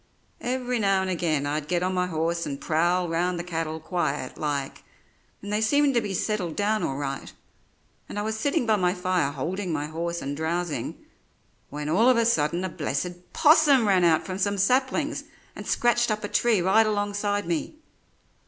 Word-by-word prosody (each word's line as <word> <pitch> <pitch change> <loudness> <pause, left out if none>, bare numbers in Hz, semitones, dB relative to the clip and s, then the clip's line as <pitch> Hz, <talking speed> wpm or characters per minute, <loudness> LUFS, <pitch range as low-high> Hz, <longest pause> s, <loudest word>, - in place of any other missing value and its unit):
Every 250 -1 -1
now 195 -2 +2
and 190 - -2
again 160 -5 0
I'd 150 +1 -2
get 175 +1 0
on 185 +1 0
my 180 0 0
horse 170 0 -1
and 140 -1 -4
prowl 175 +3 +1
round 175 +2 0
the 170 - -3
cattle 165 -2 -3
quiet 155 -5 -2
like, 145 -3 -3 0.6
and 205 +1 -4
they 210 - +1
seemed 285 +5 +3
to 235 - +3
be 200 -3 -3
settled 185 -5 -1
down 215 +1 +1
all 135 - -2
right, 140 -1 -4 0.8
and - - -6
I 205 - -1
was 220 +1 -2
sitting 280 +4 0
by 220 -2 +3
my 180 -1 +1
fire 180 -5 0
holding 175 +7 -3
my 150 -2 -1
horse 170 +2 -3
and 140 +1 -3
drowsing, 165 +1 -2 0.7
when 150 +1 -5
all 205 +11 +4
of 255 - +4
a 230 - +3
sudden 170 -5 +1
a - - -2
blessed 175 +3 -4
'possum 300 -6 +5
ran 190 -3 +4
out 165 -2 +3
from 185 0 -5
some 200 +1 0
saplings 255 +7 +1 0.3
and - - -8
scratched 240 0 +2
up 215 0 -1
a - - -1
tree 220 -4 +2
right 215 +4 +4
alongside 205 -1 -1
me. 170 - -2
180 Hz, 190 wpm, -26 LUFS, 160-215 Hz, 0.8 s, possum